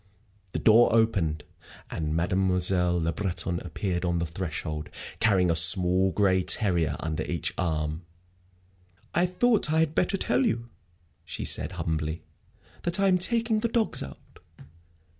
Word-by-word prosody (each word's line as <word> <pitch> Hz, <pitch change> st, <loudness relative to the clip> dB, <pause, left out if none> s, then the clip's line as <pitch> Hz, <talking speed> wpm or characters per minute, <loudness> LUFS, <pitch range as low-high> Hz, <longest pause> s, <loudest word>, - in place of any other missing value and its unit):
The -, -, -2 dB
door 115 Hz, +2 st, +5 dB
opened, 95 Hz, -10 st, +1 dB, 0.5 s
and 80 Hz, -1 st, -3 dB
Mademoiselle 90 Hz, 0 st, +1 dB
Le 85 Hz, 0 st, -1 dB
Breton 90 Hz, -1 st, -3 dB
appeared 90 Hz, +1 st, -4 dB
on 85 Hz, -1 st, 0 dB
the 85 Hz, -, -1 dB
threshold, 80 Hz, -2 st, -5 dB, 0.3 s
carrying 95 Hz, -5 st, +3 dB
a -, -, 0 dB
small 90 Hz, +3 st, +5 dB
gray 95 Hz, -2 st, +2 dB
terrier 85 Hz, -7 st, +1 dB
under 80 Hz, -1 st, -3 dB
each 85 Hz, -1 st, -3 dB
arm. 80 Hz, -2 st, -2 dB, 1.1 s
"I 175 Hz, +2 st, +2 dB
thought 205 Hz, -2 st, +2 dB
I 160 Hz, 0 st, +3 dB
had 160 Hz, -2 st, 0 dB
better 185 Hz, +4 st, 0 dB
tell 125 Hz, -7 st, 0 dB
you," 115 Hz, -1 st, -2 dB, 0.5 s
she -, -, -6 dB
said, -, -, +2 dB
humbly, 80 Hz, 0 st, -3 dB, 0.6 s
"that 175 Hz, +3 st, -1 dB
I 195 Hz, 0 st, +3 dB
am 180 Hz, -1 st, +3 dB
taking 230 Hz, +3 st, +2 dB
the 235 Hz, -, 0 dB
dogs 230 Hz, -1 st, 0 dB
out. 70 Hz, -, -11 dB
90 Hz, 140 wpm, -26 LUFS, 80-120 Hz, 1.1 s, door